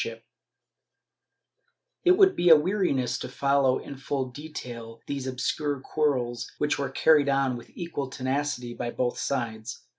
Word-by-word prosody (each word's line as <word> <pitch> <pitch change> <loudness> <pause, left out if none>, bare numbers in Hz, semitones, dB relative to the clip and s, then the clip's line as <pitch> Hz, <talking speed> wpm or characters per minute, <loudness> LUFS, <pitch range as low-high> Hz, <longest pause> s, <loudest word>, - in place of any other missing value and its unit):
^ - - -7 1.8
It 360 - +6
would 385 -2 +6
be 175 - +3
a 160 - +11
weariness 150 - +1
to - - -5
follow 140 -2 +2
in 140 - -8
further 135 -1 -3
detail 120 -6 -8
these 140 -2 -4
obscure 140 +2 -1
quarrels 130 -5 -1
which 150 -1 0
were 140 - -1
carried 150 -3 +4
on 135 -2 +2
with 120 -1 -10
equal 160 -6 -4
tenacity 130 -2 -2
by 120 - -4
both 120 0 -2
sides. 115 -3 -3
135 Hz, 145 wpm, -27 LUFS, 125-150 Hz, 1.8 s, a